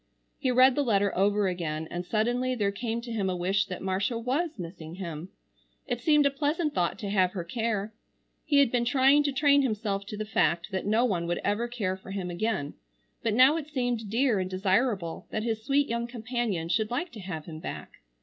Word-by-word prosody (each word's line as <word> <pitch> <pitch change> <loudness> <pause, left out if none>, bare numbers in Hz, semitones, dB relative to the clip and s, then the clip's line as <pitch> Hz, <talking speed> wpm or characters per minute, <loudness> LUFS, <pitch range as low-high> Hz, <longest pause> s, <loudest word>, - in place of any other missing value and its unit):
He 260 - 0
read 255 +1 +6
the 290 - +1
letter 205 -6 +1
over 200 +1 +2
again, 160 -3 -3
and 175 0 -3
suddenly 240 +6 0
there 205 -4 +1
came 230 +3 -3
to 235 0 -8
him 205 -4 -1
a 185 - -1
wish 190 +2 +1
that 185 - -6
Marcia 195 +5 0
was 285 +8 -1
missing 165 -2 -8
him. 170 -2 -6 0.6
It 240 -1 -3
seemed 300 +1 +4
a 280 - +4
pleasant 300 +2 -1
thought 175 -1 0
to 200 -2 -4
have 185 -3 +2
her 180 - -3
care. 220 +2 -2 0.5
He 290 - +2
had 280 -4 +5
been 245 -1 +2
trying 270 +4 +4
to 290 -1 0
train 285 +1 +4
himself 210 -5 -2
to 210 - -6
the 215 - -3
fact 170 -4 +1
that 190 0 -2
no 220 +4 +3
one 175 -7 -1
would 175 - -1
ever 210 +4 0
care 215 -6 -2
for 190 - -13
him 190 -2 -4
again, 175 -6 -2 0.5
but 225 -2 0
now 260 +6 +6
it 305 -3 -5
seemed 245 -7 -2
dear 235 -1 +2
and 185 0 -2
desirable 190 -1 0
that 215 - -2
his 225 -1 -2
sweet 280 +3 +2
young 235 +1 -2
companion 235 -7 -2
should 215 +4 +1
like 315 +8 -2
to 220 - -10
have 175 -5 -6
him 155 -2 -8
back. - - -8
215 Hz, 215 wpm, -28 LUFS, 185-250 Hz, 0.6 s, read